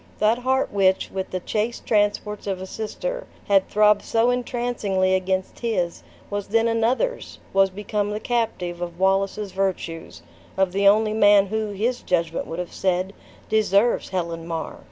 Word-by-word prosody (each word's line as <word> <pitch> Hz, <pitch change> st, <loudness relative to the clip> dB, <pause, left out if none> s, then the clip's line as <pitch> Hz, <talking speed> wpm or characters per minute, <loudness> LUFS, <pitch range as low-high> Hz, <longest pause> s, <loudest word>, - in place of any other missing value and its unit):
That 220 Hz, +3 st, +2 dB
heart 260 Hz, -1 st, 0 dB
which, 190 Hz, -2 st, +2 dB
with 190 Hz, -1 st, -4 dB
the 185 Hz, -, -3 dB
chaste 220 Hz, +5 st, -2 dB
transports 205 Hz, -1 st, 0 dB
of 190 Hz, -2 st, -2 dB
a 190 Hz, -, -5 dB
sister, -, -, -5 dB, 0.2 s
had 195 Hz, -1 st, +3 dB
throbbed 210 Hz, 0 st, +4 dB
so 230 Hz, +2 st, +2 dB
entrancingly 235 Hz, -6 st, 0 dB
against 190 Hz, 0 st, -1 dB
his, 185 Hz, -8 st, -1 dB, 0.3 s
was 205 Hz, -1 st, -3 dB
then 225 Hz, +2 st, +2 dB
another's! 235 Hz, -, 0 dB, 0.2 s
was 195 Hz, 0 st, +4 dB
become 205 Hz, +1 st, -2 dB
the 210 Hz, +1 st, -3 dB
captive 190 Hz, -8 st, -2 dB
of 175 Hz, 0 st, -5 dB
Wallace's 195 Hz, +1 st, +1 dB
virtues; 180 Hz, -, -3 dB, 0.3 s
of 190 Hz, -1 st, +2 dB
the 200 Hz, +2 st, +2 dB
only 215 Hz, +1 st, +4 dB
man 205 Hz, -2 st, +6 dB
who, 215 Hz, +2 st, -2 dB
his 230 Hz, +5 st, -1 dB
judgment 165 Hz, -2 st, -1 dB
would 165 Hz, -, -5 dB
have 180 Hz, -1 st, -5 dB
said, 185 Hz, +1 st, 0 dB, 0.3 s
deserves 215 Hz, +1 st, +2 dB
Helen 170 Hz, -3 st, -3 dB
Mar! 165 Hz, -1 st, -4 dB
200 Hz, 155 wpm, -23 LUFS, 185-220 Hz, 0.3 s, man